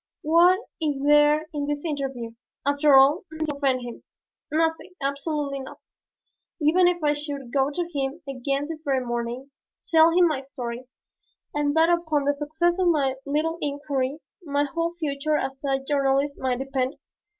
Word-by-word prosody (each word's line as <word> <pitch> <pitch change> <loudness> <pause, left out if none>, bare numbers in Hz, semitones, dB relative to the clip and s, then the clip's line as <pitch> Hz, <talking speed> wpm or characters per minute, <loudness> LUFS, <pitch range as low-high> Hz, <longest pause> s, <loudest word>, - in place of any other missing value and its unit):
What 345 +5 +5 0.2
is 295 -3 0
there 295 +1 +5
in 290 -1 -2
this 290 +2 -3
interview, 270 -6 -3 0.3
after 285 0 +4
all, 275 +6 +6
to 310 -2 -2
offend 270 -3 +1
him? 240 -1 -8 0.5
Nothing, 325 +3 0
absolutely 280 0 -2
nothing. 265 - -10 0.8
Even 340 +4 +4
if 350 -2 0
I 295 0 +3
should 285 -4 -6
go 270 0 +2
to 340 +4 -3
him 275 +2 -2
again 275 +2 -2
this 320 -1 -6
very 270 -4 0
morning, 240 +3 -4 0.4
tell 325 0 +7
him 350 +1 +4
my 300 -5 -1
story 250 -2 -7 0.7
and 295 0 0
that 325 +1 +5
upon 320 -4 +1
the 285 - +3
success 315 +5 0
of 370 - +3
my 285 -6 +2
little 315 +4 -1
inquiry 285 -1 -2 0.3
my 285 -2 0
whole 335 +3 -2
future 305 -2 -1
as 270 0 -4
a 270 -1 +1
journalist 275 0 0
might 255 -1 0
depend? 270 0 -2
285 Hz, 160 wpm, -25 LUFS, 270-315 Hz, 0.8 s, tell